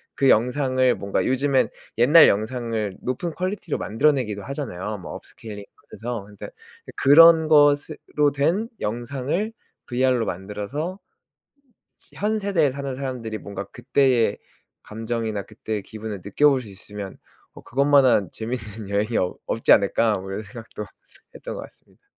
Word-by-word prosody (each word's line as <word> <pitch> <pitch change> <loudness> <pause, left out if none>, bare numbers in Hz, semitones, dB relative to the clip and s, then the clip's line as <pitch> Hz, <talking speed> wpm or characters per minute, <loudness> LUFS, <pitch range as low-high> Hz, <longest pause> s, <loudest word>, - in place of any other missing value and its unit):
그 135 -1 +3
영상을 130 +1 +3
뭔가 100 0 -2
요즘에는 130 +1 +2 0.3
옛날 150 +7 +8
영상을 110 -1 -2
높은 130 +7 -2
퀄리티로 185 -3 -3
만들어내기도 115 -4 +1
하잖아요 110 -8 -5
뭐 90 - -8
업스케일링하면서. 110 +1 -8
근데 105 -1 -10 0.5
그런 160 +2 +7
것으로 145 -1 +3
된 170 +11 +1
영상을 135 - -2 0.3
VR로 125 -1 +1
만들어서 105 - -4 1.2
'현 215 +1 -1
세대에 175 -9 +1
사는 140 -1 -5
사람들이 125 -5 -4
뭔가 100 0 -7
그때의 125 -1 +1 0.5
감정이나 110 -2 -3
그때의 110 -2 -5
기분을 110 -3 -7
느껴볼 135 +6 +3
수 110 - -11
있으면 100 0 -9 0.4
어 - - -12
그것만 140 +2 +3
한 105 -8 +3
재밌는 110 -3 -6
여행이 105 +3 0
없 90 - -1
없지 115 - +1
않을까?' 105 +1 +4
뭐 95 +1 -8
이런 105 +3 -4
생각도 105 0 -9 0.5
했던 - - -7
것 - - -6
같습니다. - - -20
120 Hz, 325 characters per minute, -23 LUFS, 105-140 Hz, 1.2 s, 옛날